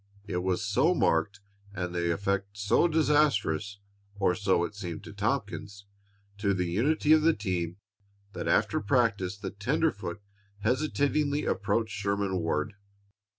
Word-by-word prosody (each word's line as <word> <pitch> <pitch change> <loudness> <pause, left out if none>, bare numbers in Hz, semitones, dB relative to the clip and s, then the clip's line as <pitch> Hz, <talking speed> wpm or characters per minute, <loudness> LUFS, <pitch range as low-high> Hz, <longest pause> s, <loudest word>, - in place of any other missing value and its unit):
It 100 -3 -3
was 90 0 0
so 130 - +2
marked, 100 - +1 0.3
and 90 -2 -3
the 85 -1 0
effect 100 +2 -2
so 105 +11 +3
disastrous, 145 - +2 0.4
or 95 -3 +2
so 95 -3 +1
it 85 - -4
seemed 90 -6 -6
to - - -10
Tompkins, 100 -2 -3 0.5
to 100 -1 +1
the 90 -1 0
unity 140 - +2
of 155 - +5
the 165 +2 +4
team, 90 -4 -2 0.6
that - - -4
after - - +2
practice 100 -4 +1
the 100 -1 -5
tenderfoot 105 - -1 0.4
hesitatingly 145 +4 +1
approached 115 -1 0
Sherman 100 -2 -1
Ward. 80 +3 -1
100 Hz, 135 wpm, -29 LUFS, 95-125 Hz, 0.6 s, of